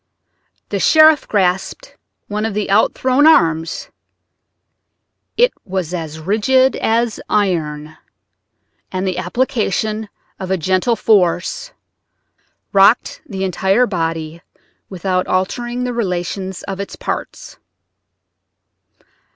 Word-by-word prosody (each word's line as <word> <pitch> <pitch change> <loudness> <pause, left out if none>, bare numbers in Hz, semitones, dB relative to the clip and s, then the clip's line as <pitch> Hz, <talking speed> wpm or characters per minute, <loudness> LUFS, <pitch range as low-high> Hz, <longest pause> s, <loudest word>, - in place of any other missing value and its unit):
The - - -2
sheriff 310 -1 +5
grasped 190 - -1 0.3
one 210 +1 -3
of 220 -2 -2
the 210 -2 -2
outthrown 255 +7 +3
arms; 165 - +2 1.5
it - - +4
was 185 -3 -4
as 160 -3 -5
rigid 240 +9 +2
as 230 0 0
iron, 155 -6 -1 0.9
and 185 0 -2
the 185 -1 -2
application 215 +1 -1 0.3
of 190 -1 -5
a 190 - +1
gentle 185 +7 +1
force 215 - +1 1.0
rocked 200 +4 +4
the 195 -3 -4
entire 190 +5 +2
body 165 -4 -3 0.5
without 185 0 -2
altering 240 +6 -2
the 250 0 -2
relation 190 -3 -3 0.2
of 195 -1 -5
its 200 - -6
parts. - - -6
195 Hz, 100 wpm, -17 LUFS, 180-235 Hz, 1.5 s, sheriff